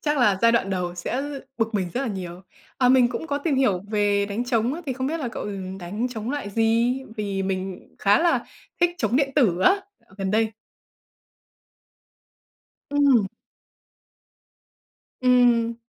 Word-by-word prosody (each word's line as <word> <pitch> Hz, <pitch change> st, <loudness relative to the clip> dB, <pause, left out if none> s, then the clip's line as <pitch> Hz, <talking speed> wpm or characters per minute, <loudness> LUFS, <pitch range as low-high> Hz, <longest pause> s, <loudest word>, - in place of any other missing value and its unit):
Chắc 295 Hz, -1 st, 0 dB
là 205 Hz, -7 st, +3 dB
giai 230 Hz, 0 st, +6 dB
đoạn 200 Hz, -4 st, +1 dB
đầu 180 Hz, -2 st, -2 dB
sẽ 235 Hz, +9 st, -3 dB, 0.4 s
bực 225 Hz, -1 st, 0 dB
mình 185 Hz, -3 st, -1 dB
rất 250 Hz, -, 0 dB
là 275 Hz, -, -2 dB
nhiều. 180 Hz, -4 st, -6 dB, 0.4 s
À, 250 Hz, -1 st, +4 dB
mình 255 Hz, -2 st, +5 dB
cũng 320 Hz, -, -5 dB
có 285 Hz, -2 st, -1 dB
tìm 295 Hz, 0 st, 0 dB
hiểu 205 Hz, -9 st, +2 dB
về 205 Hz, -1 st, +2 dB
đánh 210 Hz, +4 st, -3 dB
trống 245 Hz, +2 st, 0 dB
á, 340 Hz, -, -6 dB
thì 265 Hz, -, -1 dB
không 260 Hz, +1 st, -3 dB
biết 320 Hz, +2 st, -2 dB
là 250 Hz, -, -2 dB
cậu, -, -, -6 dB
ừm, 190 Hz, -2 st, -6 dB
đánh 205 Hz, +8 st, -3 dB
trống 230 Hz, 0 st, -5 dB
loại 285 Hz, -8 st, -4 dB
gì? 230 Hz, +3 st, +2 dB, 0.2 s
Vì 200 Hz, -2 st, -2 dB
mình 190 Hz, -1 st, -4 dB
khá 200 Hz, +1 st, +4 dB
là 340 Hz, 0 st, +2 dB, 0.4 s
thích 350 Hz, -, +4 dB
trống 250 Hz, -, +1 dB
điện 275 Hz, -1 st, +2 dB
tử 195 Hz, -, +3 dB
á 380 Hz, -, +5 dB, 0.4 s
gần 190 Hz, -1 st, -2 dB
đây. 220 Hz, +1 st, +1 dB, 2.4 s
Ừm. 280 Hz, -8 st, +4 dB, 1.9 s
Ừm 250 Hz, -1 st, +5 dB
hừm. 230 Hz, 0 st, -1 dB
230 Hz, 170 wpm, -24 LUFS, 195-260 Hz, 2.4 s, giai